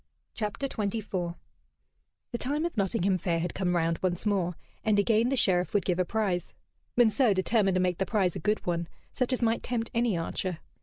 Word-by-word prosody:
CHAPTER 215 Hz, +5 st, -2 dB
XXIV 200 Hz, -6 st, -2 dB, 1.0 s
The 240 Hz, -, -2 dB
time 295 Hz, +5 st, -1 dB
of 345 Hz, -, -3 dB
Nottingham 190 Hz, -2 st, +1 dB
Fair 170 Hz, -1 st, 0 dB
had 170 Hz, 0 st, -2 dB
come 180 Hz, -2 st, 0 dB
round 165 Hz, -1 st, +1 dB
once 180 Hz, 0 st, -1 dB
more, 185 Hz, -4 st, +1 dB, 0.3 s
and 215 Hz, -2 st, +3 dB
again 220 Hz, +3 st, +3 dB
the 270 Hz, -, +1 dB
Sheriff 185 Hz, -5 st, +2 dB
would 205 Hz, -, +2 dB
give 180 Hz, -1 st, +1 dB
a 185 Hz, -, +3 dB
prize. 195 Hz, -3 st, -1 dB, 0.4 s
Monceux 240 Hz, -2 st, +4 dB
determined 195 Hz, 0 st, +2 dB
to 185 Hz, -, +3 dB
make 180 Hz, -2 st, 0 dB
the 190 Hz, -, 0 dB
prize 190 Hz, -6 st, +1 dB
a -, -, -3 dB
good 210 Hz, +6 st, 0 dB
one, 170 Hz, -1 st, -1 dB, 0.3 s
such 255 Hz, 0 st, 0 dB
as 255 Hz, -1 st, 0 dB
might 225 Hz, 0 st, +2 dB
tempt 230 Hz, -2 st, -2 dB
any 235 Hz, -5 st, +1 dB
archer. 170 Hz, +1 st, -2 dB
200 Hz, 195 wpm, -29 LUFS, 180-225 Hz, 1.0 s, Monceux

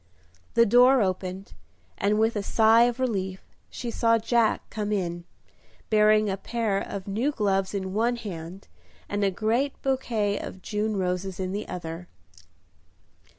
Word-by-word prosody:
The 235 Hz, -, +6 dB
door 245 Hz, +2 st, +6 dB
opened, 185 Hz, 0 st, -4 dB, 0.4 s
and 205 Hz, +2 st, +1 dB
with 225 Hz, +1 st, +2 dB
a 205 Hz, -, 0 dB
sigh 225 Hz, +3 st, +5 dB
of 245 Hz, +1 st, -1 dB
relief 190 Hz, -7 st, -2 dB, 0.3 s
she 240 Hz, -2 st, -5 dB
saw 230 Hz, 0 st, +3 dB
Jack 230 Hz, 0 st, +1 dB
come 210 Hz, -2 st, -3 dB
in, 175 Hz, -4 st, -2 dB, 0.7 s
bearing 215 Hz, 0 st, +4 dB
a 195 Hz, -1 st, -1 dB
pair 220 Hz, -2 st, -1 dB
of 195 Hz, -1 st, -6 dB
new 225 Hz, +9 st, 0 dB
gloves 195 Hz, -5 st, 0 dB
in 190 Hz, -1 st, -3 dB
one 235 Hz, +4 st, +1 dB
hand 185 Hz, -4 st, -8 dB, 0.4 s
and 205 Hz, 0 st, -2 dB
a 200 Hz, -, +3 dB
great 230 Hz, +8 st, -1 dB
bouquet 230 Hz, -6 st, 0 dB
of 185 Hz, -, -8 dB
June 210 Hz, 0 st, -2 dB
roses 180 Hz, 0 st, -2 dB
in 185 Hz, -1 st, -2 dB
the 205 Hz, +2 st, -4 dB
other. 170 Hz, 0 st, -6 dB
210 Hz, 150 wpm, -26 LUFS, 190-230 Hz, 0.7 s, The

